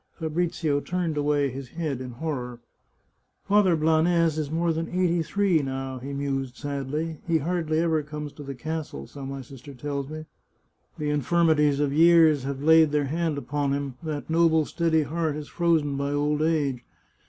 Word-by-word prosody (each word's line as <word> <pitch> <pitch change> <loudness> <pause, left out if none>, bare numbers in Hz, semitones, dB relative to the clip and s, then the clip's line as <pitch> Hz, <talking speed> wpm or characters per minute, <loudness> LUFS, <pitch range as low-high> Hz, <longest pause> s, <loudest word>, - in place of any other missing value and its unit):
Fabrizio 160 -2 -1
turned 175 0 -2
away 145 -1 +1
his 135 +1 -7
head 155 -5 -3
in 125 -1 -7
horror. 125 -3 -4 0.4
'' - - -46
Father 200 -3 +4
Blanes 160 +1 +3
is 150 -2 -2
more 165 +1 0
than 165 +1 -3
eighty 175 -2 +1
three 175 0 +1
now," 135 -1 -4
he 135 +3 -7
mused 135 -2 -3
sadly; 145 +3 -4
" - - -27
he 165 -1 +3
hardly 160 0 -1
ever 160 -1 +2
comes 150 0 -7
to - - -11
the 140 -1 -6
castle, 155 - -5
so 140 - -10
my 135 0 -5
sister 135 +1 -12
tells 140 +1 -4
me. 155 0 -7 0.7
The 150 -1 -1
infirmities 150 0 +2
of 145 -1 +1
years 160 -3 +5
have 140 0 -4
laid 160 0 +6
their 145 -1 +1
hand 160 +1 -1
upon 145 0 -1
him; 140 -1 -3
that 155 -3 -4
noble 160 -1 +3
steady 160 -1 +1
heart 160 0 -2
is 150 -1 -7
frozen 160 -5 +1
by 140 +1 -1
old 150 +1 0
age. 145 -6 0
150 Hz, 175 wpm, -26 LUFS, 140-165 Hz, 0.7 s, laid